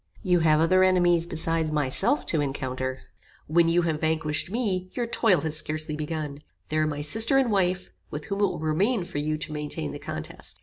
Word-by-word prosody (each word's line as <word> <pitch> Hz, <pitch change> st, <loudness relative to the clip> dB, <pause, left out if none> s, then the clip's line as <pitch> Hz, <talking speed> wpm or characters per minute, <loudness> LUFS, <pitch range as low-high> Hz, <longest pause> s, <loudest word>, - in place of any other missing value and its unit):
You 180 Hz, -3 st, +3 dB
have 155 Hz, -2 st, +3 dB
other 185 Hz, +3 st, +4 dB
enemies 175 Hz, -2 st, +4 dB
beside 165 Hz, -1 st, +1 dB
myself 150 Hz, -, +2 dB
to 160 Hz, -, +1 dB
encounter. 130 Hz, -2 st, -4 dB, 0.4 s
When 165 Hz, +2 st, +3 dB
you 175 Hz, +1 st, +2 dB
have 160 Hz, -2 st, -1 dB
vanquished 160 Hz, -1 st, 0 dB
me, 190 Hz, -5 st, -2 dB
your 240 Hz, -, -2 dB
toil 225 Hz, -7 st, +2 dB
has 155 Hz, 0 st, 0 dB
scarcely 155 Hz, 0 st, -1 dB
begun. 150 Hz, -2 st, -5 dB, 0.3 s
There 155 Hz, 0 st, 0 dB
are 155 Hz, -, +1 dB
my 145 Hz, -1 st, -4 dB
sister 225 Hz, -, +2 dB
and 260 Hz, -4 st, +2 dB
wife, 180 Hz, -, 0 dB, 0.2 s
with 150 Hz, 0 st, -6 dB
whom 200 Hz, 0 st, -4 dB
it 205 Hz, -, +4 dB
will -, -, -4 dB
remain 180 Hz, +8 st, 0 dB
for 145 Hz, -, -5 dB
you 155 Hz, +1 st, -1 dB
to 155 Hz, 0 st, -5 dB
maintain 150 Hz, -, -4 dB
the -, -, -7 dB
contest. -, -, -7 dB
160 Hz, 200 wpm, -26 LUFS, 150-185 Hz, 0.4 s, other